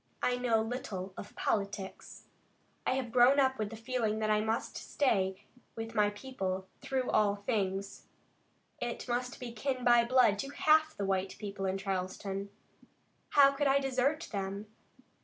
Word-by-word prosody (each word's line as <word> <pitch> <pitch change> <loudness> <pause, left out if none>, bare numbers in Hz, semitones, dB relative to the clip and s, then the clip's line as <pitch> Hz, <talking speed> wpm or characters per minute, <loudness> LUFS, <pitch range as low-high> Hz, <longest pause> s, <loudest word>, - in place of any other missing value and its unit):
I 250 - +3
know 235 -3 +2
little 205 -6 -5
of 205 - -9
politics. 200 -2 -3 0.6
I - - +3
have 255 -3 -3
grown 250 +3 +6
up 265 -2 +2
with 210 -1 -1
the 225 - -7
feeling 225 -2 -1
that 215 0 0
I 210 0 +3
must 220 +2 -2
stay 190 -8 0 0.3
with 225 0 -5
my 210 -1 +3
people 195 -4 -4 0.2
through 260 -1 -1
all 205 -1 +3
things. 200 -2 -2 0.7
I 240 -1 -2
must 245 +1 -2
be 250 -2 -6
kin 255 +3 -2
by 240 -1 +6
blood 235 -4 +4
to 275 - -3
half 310 +2 +3
the 200 - -1
white 190 0 -1
people 200 -2 -4
in 190 +1 0
Charleston. 195 +1 -3 0.8
How 275 -1 +7
could 280 +1 0
I 270 +1 +5
desert 270 +4 0
them?" 200 0 -3
225 Hz, 160 wpm, -32 LUFS, 200-255 Hz, 0.8 s, How